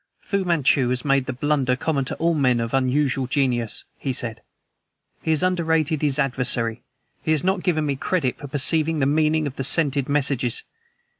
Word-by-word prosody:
"Fu 200 -1 -2
Manchu 145 -7 +2
has 125 +2 -2
made 135 -2 +2
the - - -1
blunder 135 -1 0
common 140 0 -1
to - - -4
all 170 +1 +1
men 130 -6 +2
of 115 +1 -3
unusual 135 0 +1
genius," 125 -4 0 0.2
he 135 - -2
said. 115 -3 -2 0.8
"He - - -5
has 160 +2 +2
underrated 160 -4 +1
his 145 -2 +1
adversary. 125 -4 0 0.4
He - - -5
has 155 -2 +2
not 190 0 +1
given 155 -5 0
me 140 -2 -1
credit 140 -5 -1
for 145 - -7
perceiving 155 +3 +1
the 140 - +1
meaning 155 +2 +2
of 140 -1 -5
the 135 - -2
scented 140 -1 +2
messages. 140 -4 +1
140 Hz, 180 wpm, -23 LUFS, 130-155 Hz, 0.8 s, Manchu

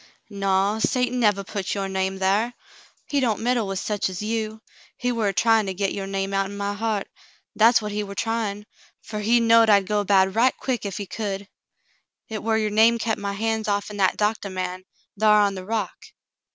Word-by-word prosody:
"Naw! 195 +1 +1
Satan 250 +2 0
nevah 205 -4 +2
put 195 0 -4
your 195 -1 -2
name 190 0 -2
thar. 200 +6 +1 0.5
He 285 - 0
don't 235 -5 0
meddle 240 -2 +1
with 195 0 -3
sech 205 0 -1
as 185 - -6
you. 220 0 -3 0.3
He 245 - -1
war 230 -3 0
a - - +2
tryin' 225 +1 +3
to 190 - -3
get 195 +1 -1
your 195 -1 -4
name 195 0 -3
out'n 195 +1 -1
my 200 0 -2
heart, 215 -1 -2 0.5
that's 225 +1 +5
what 210 - -4
he 210 +1 -2
war 200 -1 -7
tryin', 215 -2 -2 0.4
fer 215 - -6
he 230 +3 +3
knowed 230 -1 +5
I'd 200 -2 +5
go 205 +1 0
bad 190 -1 +3
right 245 +4 +3
quick 245 -5 -2
ef 195 - -5
he 205 - -4
could. 200 0 -4 0.8
Hit 220 -1 -6
war 220 0 +1
your 215 -1 0
name 225 +2 +5
kep' 220 -1 -1
my 200 0 -3
hands 220 +1 -1
off'n 205 0 -2
that 190 -2 +2
doctah 210 -1 0
man 185 0 -4 0.3
thar 215 -1 +5
on 200 -1 +2
the 185 -1 -8
rock. 225 0 -2
210 Hz, 205 wpm, -24 LUFS, 195-225 Hz, 0.8 s, that's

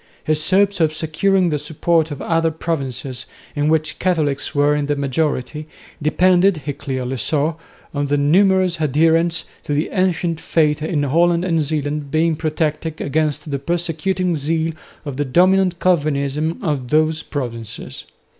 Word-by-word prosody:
His 155 0 0
hopes 200 0 +3
of 155 -2 +2
securing 180 +4 +1
the 150 -2 -1
support 160 +2 0
of 145 - -5
the - - -7
other 165 0 +2
provinces, 135 -6 -4 0.3
in 145 +1 +1
which 160 0 0
Catholics 155 -8 0
were 145 +1 +3
in 145 -1 -1
the 145 - +1
majority, 145 +1 -2 0.3
depended, 180 +1 +3
he 145 - -2
clearly 130 -1 -4
saw, 150 +6 0 0.4
on 145 -1 -1
the 145 +1 +1
numerous 180 +3 +3
adherents 165 +3 +2 0.2
to 145 - -2
the 150 - 0
ancient 175 -4 0
faith 150 -3 +1
in 155 -1 -1
Holland 170 +5 +2
and 165 -3 +1
Zeeland 145 -1 -2
being 160 +2 +2
protected 155 0 -2
against 150 +1 -1
the 140 - -1
persecuting 175 +3 -1
zeal 160 +2 -1 0.3
of 140 -3 -5
the 145 - +1
dominant 180 +5 +3
Calvinism 150 -2 0
of 145 -7 -1
those 155 +3 +2
provinces. 115 -5 -6
155 Hz, 150 wpm, -19 LUFS, 145-170 Hz, 0.4 s, hopes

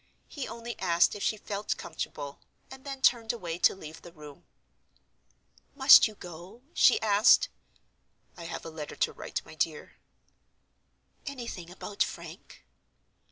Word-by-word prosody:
He 280 -4 -6
only 235 +1 -7
asked 175 -2 +3
if 205 - -7
she 215 - 0
felt 205 0 -4
comfortable; 145 -1 -6 0.3
and 265 0 -11
then 275 -2 -7
turned 230 -3 +4
away 175 -8 -5
to - - +4
leave 160 -4 -11
the 175 - -12
room. 150 0 -13 1.3
"Must 265 -2 +8
you 215 - -11
go?" 180 +7 -11
she 250 - +5
asked. 210 0 +5 0.9
"I 170 - -9
have 165 - -6
a 165 - -7
letter 155 -2 -7
to - - 0
write, - - -5
my - - -12
dear." 470 - -3 1.3
"Anything 235 -11 -6
about 200 +3 -8
Frank?" - - -5
200 Hz, 140 wpm, -29 LUFS, 170-235 Hz, 1.3 s, Must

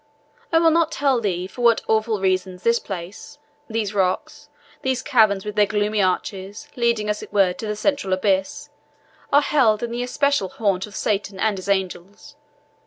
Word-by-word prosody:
I 325 - +4
will 325 0 +5
not 330 0 +2
tell 270 -5 +1
thee 185 -4 -1
for 220 +6 -9
what 235 -2 +4
awful 220 -1 +1
reason 185 -1 0
this 230 +5 +1
place 190 +8 -8 0.3
these 220 -2 -2
rocks 185 -2 -2 0.3
these 260 -1 -1
caverns 215 -8 +3
with 210 0 -5
their 210 -1 +4
gloomy 210 0 0
arches, 190 +2 -2
leading 235 -3 +1
as 210 0 -2
it - - -10
were 195 -3 +3
to 220 - -7
the 210 - -2
central 280 -3 -1
abyss 190 0 0 0.6
are 290 +1 +5
held 240 -8 +2
an 235 0 -3
especial 250 -2 0
haunt 195 -2 -1
of 210 - -13
Satan 200 -2 -2
and 215 0 +1
his 185 - -8
angels. 195 +7 -3
210 Hz, 175 wpm, -22 LUFS, 190-235 Hz, 0.6 s, will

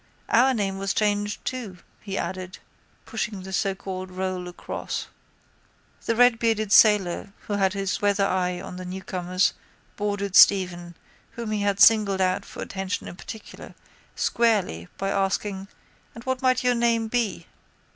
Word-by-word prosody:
Our 255 +3 +4
name 195 -3 -2
was 195 0 -1
changed 205 -1 0
too, 230 -8 -4 0.2
he 195 -2 -5
added, 185 0 -4 0.5
pushing 210 -3 -4
the 190 0 -8
socalled 190 -1 -2
roll 185 -1 -3
across. 180 - -5 1.0
The 230 - +2
redbearded 230 -3 +3
sailor 205 -3 +4
who 210 - -5
had 195 -1 +2
his 195 -2 -2
weather 205 -1 +2
eye 180 -2 0
on 180 0 -8
the 185 - -6
newcomers 185 0 -1 0.4
boarded 205 -2 -2
Stephen, 175 -3 +5 0.4
whom 235 -2 -5
he 210 -1 -1
had 200 -1 0
singled 210 -3 +6
out 185 -1 +1
for - - -7
attention 190 0 -4
in - - -8
particular, 215 +3 -10 0.4
squarely 205 - +1
by 195 - -2
asking: 195 0 -1 0.5
—And 230 - -10
what 260 0 -2
might 255 -1 +2
your 250 0 +3
name 235 -1 +1
be? 235 -2 -1
200 Hz, 145 wpm, -25 LUFS, 185-220 Hz, 1.0 s, singled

